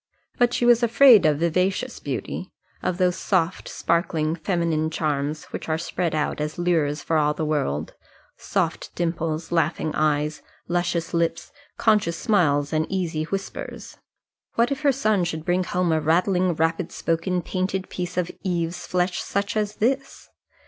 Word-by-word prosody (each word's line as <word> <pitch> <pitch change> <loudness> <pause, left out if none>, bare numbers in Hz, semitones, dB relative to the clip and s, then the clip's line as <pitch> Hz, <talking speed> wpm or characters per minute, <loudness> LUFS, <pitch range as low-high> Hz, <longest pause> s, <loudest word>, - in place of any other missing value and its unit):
But 245 -1 +4
she 240 - 0
was 240 0 +6
afraid 235 - +7
of 150 -2 +2
vivacious 180 +4 0
beauty, - - -5 0.3
of 180 - -1
those 180 -1 +2
soft, 185 -2 0
sparkling 165 -2 0
feminine 165 -2 0
charms 150 -1 -2
which - - -6
are 160 - +1
spread 170 0 -2
out 150 0 -1
as 150 0 -3
lures 160 -4 +1
for 165 - +1
all 150 -1 +2
the 160 - -2
world, 80 - -1 0.4
soft - - -2
dimples, 165 -1 -2
laughing 165 -2 +1
eyes, 150 0 0 0.3
luscious 175 -1 -1
lips, 170 0 -1 0.3
conscious 205 -7 +2
smiles, 160 - +2
and 155 0 +1
easy 165 -5 -1
whispers. 195 +3 -6 0.6
What 235 +3 +2
if 275 - -2
her 285 -2 +4
son 215 -7 +1
should 160 -2 -3
bring 180 0 +1
her - - -9
home 180 -1 +1
a 160 -1 +2
rattling, 180 +2 +2
rapid 165 +2 0
spoken, 170 +2 -1
painted 190 0 -2
piece 180 0 -5
of 180 -1 0
Eve's 175 -2 -2
flesh 180 0 0
such 200 +1 -2
as 210 -1 -1
this? 265 +5 -1
170 Hz, 155 wpm, -24 LUFS, 155-185 Hz, 0.6 s, afraid